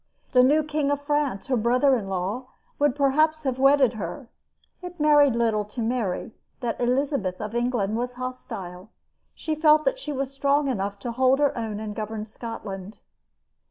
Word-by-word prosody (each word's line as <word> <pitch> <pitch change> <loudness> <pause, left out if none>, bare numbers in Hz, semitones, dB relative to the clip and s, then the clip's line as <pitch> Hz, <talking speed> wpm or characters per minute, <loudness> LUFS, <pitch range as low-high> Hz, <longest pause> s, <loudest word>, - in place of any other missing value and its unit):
The 250 - +6
new 295 +5 +4
King 300 -1 -1
of 285 0 0
France, 290 -8 -1
her 265 - 0
brother 250 +4 +3
in 205 -5 -4
law, 195 +7 -3 0.3
would 290 -3 +2
perhaps 310 +3 +2
have 260 -2 -2
wedded 275 -2 +5
her. 220 - -6 0.5
It 355 -1 -9
mattered 295 -4 +5
little 225 -3 +1
to 210 +4 -10
Mary 220 -5 -2 0.3
that 240 -2 -3
Elizabeth 245 -6 0
of 215 0 -5
England 240 -4 0
was 245 +2 -3
hostile. 205 -7 -7 0.5
She 315 - -3
felt 305 0 +4
that - - +1
she 300 - -5
was 275 -1 -3
strong 280 +1 +1
enough 200 -5 -2
to 240 - -3
hold 260 +2 +3
her 290 -1 +2
own 220 -3 -4
and 215 -1 -5
govern 215 0 -4
Scotland. 210 -3 -7
250 Hz, 170 wpm, -25 LUFS, 215-285 Hz, 0.5 s, The